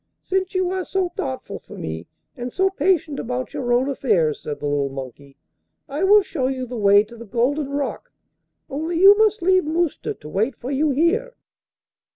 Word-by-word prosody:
'Since 380 0 -1
you 370 -1 +1
are 375 0 -2
so 375 0 -1
thoughtful 130 - -5
for - - -13
me, 80 +1 -5 0.3
and 245 0 -5
so 385 +6 +1
patient 340 -7 +1
about 250 +1 -4
your 245 -2 -2
own 245 +2 +3
affairs,' 205 - +1
said 150 - -5
the - - -5
little 145 -1 0
monkey, 135 +1 -9 0.5
'I 295 +7 -1
will 410 +1 +6
show 275 -9 -2
you 260 -1 -2
the 250 0 -7
way 205 -2 +5
to 225 +2 -14
the 235 - -10
Golden 265 +6 0
Rock, 280 0 -4 0.6
only 320 +4 -3
you 395 +2 +9
must 430 -3 +3
leave 370 +1 +4
Mousta 320 +1 -1
to 150 - -13
wait 215 - -1
for 250 +5 -6
you 295 +3 +1
here. 360 - +1
275 Hz, 190 wpm, -22 LUFS, 215-360 Hz, 0.6 s, you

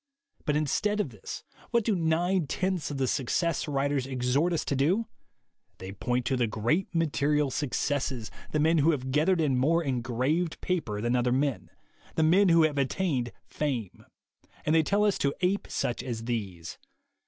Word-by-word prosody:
But 150 - +1
instead 210 +8 0
of 205 - 0
this, 105 -4 -8 0.3
what 235 -1 +2
do 215 -1 +1
nine 170 +1 +1
tenths 185 0 -1
of 145 - -4
the 135 -1 +1
Success 160 +7 0
writers 140 -2 0
exhort 130 +6 +1
us 165 - -1
to 140 - -1
do? 175 - +2 0.7
They 95 +1 -7
point 120 +5 -1
to 135 - +1
the 120 -2 +1
great 120 - 0
material 150 -3 +1
successes, 135 -3 -2 0.2
the 155 - 0
men 160 +2 +3
who 150 +3 +4
have 130 -2 -3
gathered 165 +6 +3
in 140 -5 +2
more 165 +6 +3
engraved 130 +6 -1
paper 120 - -2
than 120 +2 +1
other 125 0 +2
men, 135 -1 0 0.5
the 160 - +2
men 185 +5 +5
who 165 -1 +6
have 150 -2 +1
attained 135 -4 0
fame; 125 -10 -3 0.6
and 155 - +2
they 160 - +6
tell 200 +6 +2
us 205 - +1
to 140 0 0
ape 190 +3 +1
such 120 - -1
as 115 -3 -5
these. 100 -8 -4
145 Hz, 175 wpm, -28 LUFS, 125-165 Hz, 0.7 s, who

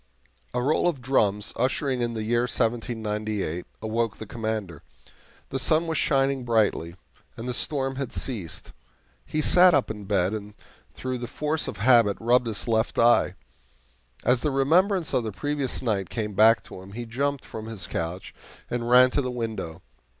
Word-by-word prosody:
A 125 - 0
roll 155 +5 +2
of 155 -6 -4
drums, 110 -5 +1
ushering 130 +1 0
in 120 -1 -1
the 110 - -3
year 120 +2 +1
1798, 110 -6 -2 0.2
awoke 115 0 -1
the 110 - -7
Commander. 110 -8 -4 0.7
The 135 - -3
sun 155 +6 +3
was 160 -2 -1
shining 135 -1 +1
brightly, 105 -8 +1 0.4
and 115 - -6
the 125 - -1
storm 135 0 -1
had 135 -3 -3
ceased. 105 - -5 0.6
He 155 0 -1
sat 180 0 +7
up 135 -5 +1
in 105 -2 -8
bed, 95 -1 +1
and 105 -1 -6 0.4
through 130 -1 -4
the 120 - -5
force 150 +5 -2
of - - -5
habit 115 -1 +4
rubbed 120 +1 +3
his 110 0 -3
left 110 0 0
eye. 120 +1 +4 0.9
As 125 0 +3
the 150 - +1
remembrance 165 +7 +2
of 120 - +2
the 110 - -3
previous 145 +3 -3
night 100 -6 -1
came 105 -2 -3
back 110 +3 +5
to 90 - -10
him, 95 +1 -12
he 120 +2 -5
jumped 140 +4 -2
from 110 0 -7
his 110 -4 -4
couch 85 +3 -4 0.4
and 120 -1 -2
ran 125 +1 +7
to 145 - +1
the 130 - -3
window. 110 -9 -5
120 Hz, 170 wpm, -26 LUFS, 110-135 Hz, 0.9 s, sat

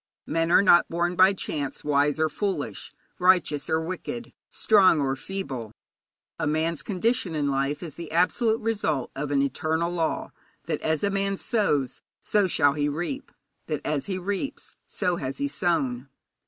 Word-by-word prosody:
Men 165 +1 0
are 175 - +6
not 175 -3 +6
born 175 +1 0
by 185 +2 +6
chance 145 -7 -4
wise 145 0 +2
or 160 - +3
foolish, 195 +5 -3 0.3
righteous 180 -5 +3
or 160 - +2
wicked, 185 +8 -5 0.2
strong 195 -7 +4
or 135 -2 0
feeble. 135 - -5 0.7
A 160 - 0
man's 160 0 0
condition 190 - 0
in 145 -2 0
life 140 +4 -1
is 160 -4 -6
the 170 +1 -8
absolute 220 +7 +2
result 205 - -1
of 140 +1 -3
an 140 -1 +2
eternal 160 +5 -1
law 165 -2 -2 0.3
that - - -2
as 160 -1 0
a 200 - +2
man 195 0 0
sows 150 - 0 0.2
so 205 -2 +1
shall 145 -5 +3
he 145 0 0
reap; 175 - -4 0.4
that 150 -3 -2
as 150 -2 -1
he 190 -2 -2
reaps 200 +8 -4
so 180 -1 -1
has 135 -2 -4
he 140 - -1
sown. 140 -4 -1
165 Hz, 165 wpm, -26 LUFS, 145-190 Hz, 0.7 s, are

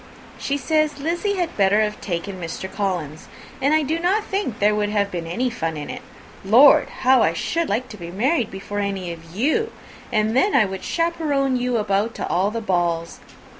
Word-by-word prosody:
She 280 - -1
says 310 +1 +1
Lizzy 345 +7 -1
had 350 -3 -2
better 200 +1 +3
have 210 0 -2
taken 185 +1 -4
Mr. 170 +3 -5
Collins; 180 -7 -3 0.3
but 280 - +2
I 310 0 +3
do 315 +4 -1
not 385 +5 +1
think 390 - -3
there 210 +1 +3
would 210 0 0
have 205 -1 0
been 170 -2 -4
any 245 +9 -1
fun 165 -9 -3
in 145 - -5
it. - - -7 0.4
Lord! 240 +9 +6
how 260 -1 +5
I 165 - +3
should 330 - -1
like 250 +2 -1
to 210 - -9
be 170 -2 -8
married 240 - 0
before 195 +1 -5
any 195 -3 -2
of 165 0 -11
you! 315 - +1 0.4
and 215 +1 +1
then 390 +10 +3
I 230 -5 +5
would 190 -1 -6
chaperon 305 -6 0
you 250 -1 0
about 210 +1 0
to - - -4
all 185 +3 +1
the 230 +2 -4
balls. 175 -4 -1
215 Hz, 200 wpm, -22 LUFS, 190-285 Hz, 0.4 s, Lord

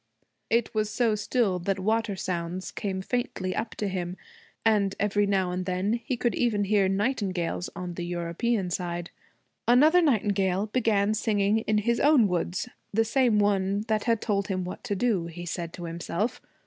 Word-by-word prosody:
It 230 0 +1
was 215 -1 0
so 225 +1 +1
still 210 -2 0
that 195 +3 -1
water 215 +1 0
sounds 180 0 -3
came 190 -3 -3
faintly 190 -6 -2
up 225 - -3
to 210 - -2
him, 180 -1 -3 0.5
and 205 -3 +3
every 205 0 +2
now 190 -2 +1
and 180 +1 -3
then 185 +3 0
he 245 - -2
could 240 0 0
even 220 -4 +1
hear 200 -1 +3
nightingales 195 -5 -1
on 180 -1 -5
the 175 - -5
European 175 +4 -1
side. 175 -1 -3 0.6
Another 300 +9 +6
nightingale 200 - +2
began 215 -2 +1
singing 210 -1 +1
in 215 - +3
his 235 +3 +1
own 285 -7 +5
woods 180 +3 -1 0.2
the 225 +2 +2
same 235 -1 +3
one 200 -1 +2
that 215 -1 +1
had 230 -2 +2
told 200 -3 0
him 185 -2 -1
what 180 - -7
to 205 - -1
do, 200 -5 +1
he 175 +1 -8
said 170 -1 -4
to 175 - -8
himself. 170 +8 -3
200 Hz, 175 wpm, -27 LUFS, 185-225 Hz, 0.6 s, Another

